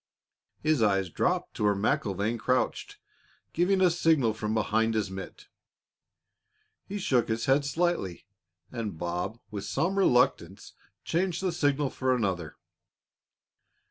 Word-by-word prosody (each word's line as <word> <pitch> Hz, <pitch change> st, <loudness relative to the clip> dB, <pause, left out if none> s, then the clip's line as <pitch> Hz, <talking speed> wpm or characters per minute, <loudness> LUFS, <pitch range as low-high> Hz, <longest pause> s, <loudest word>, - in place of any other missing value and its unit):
His 155 Hz, -4 st, +2 dB
eyes 95 Hz, -4 st, +2 dB
dropped -, -, 0 dB
to -, -, -2 dB
where 105 Hz, -1 st, +3 dB
MacIlvaine 100 Hz, +2 st, 0 dB
crouched, 125 Hz, +2 st, -1 dB, 0.6 s
giving 185 Hz, +3 st, +2 dB
a 180 Hz, -2 st, +5 dB
signal 160 Hz, -9 st, +2 dB
from 110 Hz, 0 st, -3 dB
behind 110 Hz, +1 st, +1 dB
his 105 Hz, -3 st, -1 dB
mitt. 95 Hz, 0 st, -8 dB, 1.4 s
He 205 Hz, -, -4 dB
shook 130 Hz, -, +1 dB
his 115 Hz, 0 st, -1 dB
head 140 Hz, +2 st, +3 dB
slightly, 140 Hz, -, -1 dB, 0.5 s
and 105 Hz, -7 st, -4 dB
Bob, 90 Hz, +7 st, -3 dB
with 100 Hz, -2 st, -5 dB
some 170 Hz, -, 0 dB
reluctance, 125 Hz, -8 st, +1 dB, 0.3 s
changed 180 Hz, +1 st, -1 dB
the 185 Hz, -, +1 dB
signal 145 Hz, -4 st, 0 dB
for 130 Hz, -1 st, 0 dB
another. 90 Hz, -9 st, -2 dB
115 Hz, 125 wpm, -28 LUFS, 100-155 Hz, 1.4 s, a